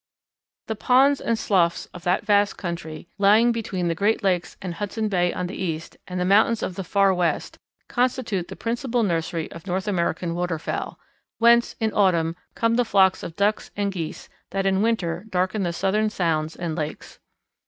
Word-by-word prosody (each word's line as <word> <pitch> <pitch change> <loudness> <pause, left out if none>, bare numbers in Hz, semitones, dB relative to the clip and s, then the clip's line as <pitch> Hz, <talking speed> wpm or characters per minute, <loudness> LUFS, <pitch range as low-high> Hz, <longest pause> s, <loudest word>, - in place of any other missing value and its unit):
The 220 - -3
ponds 265 +5 +4
and 230 -1 0
sloughs 175 -6 +1
of 175 0 -8
all - - +4
that - - -8
vast 205 -1 +3
country 170 -3 -6
lying 215 +4 +5
between 200 -6 -2
the 170 - +1
Great 205 +6 +1
Lakes 180 -3 0
and 185 -2 -5
Hudson 210 +4 -3
Bay 180 -3 +2
on 180 - -3
the 180 - -6
east 165 -4 -4
and 180 0 -4
the 180 - 0
mountains 215 +4 +4
of - - -2
the 195 +1 -5
Far 195 +1 +3
West, 175 -3 -1 0.3
constitute 240 -7 0
the - - -8
principal 240 +1 -1
nursery 165 -3 -1
of 165 +4 -11
North 190 +2 -2
American 170 -3 -1
waterfowl, 175 -2 -3 0.4
whence, 235 +1 +4
in 220 -1 0
autumn, 170 -5 +2 0.2
come 230 0 +1
the 245 - +4
flocks 190 -4 +3
of 165 - -7
Ducks 205 +3 0
and 200 -1 0
Geese 170 -5 -5 0.2
that 195 0 -2
in 190 0 +2
winter 200 -4 -1
darken 185 +2 0
the 175 -2 0
Southern 195 +5 +1
sounds 160 -5 -1
and 170 -3 -4
lakes. 155 -2 -6
190 Hz, 185 wpm, -24 LUFS, 170-215 Hz, 0.4 s, lying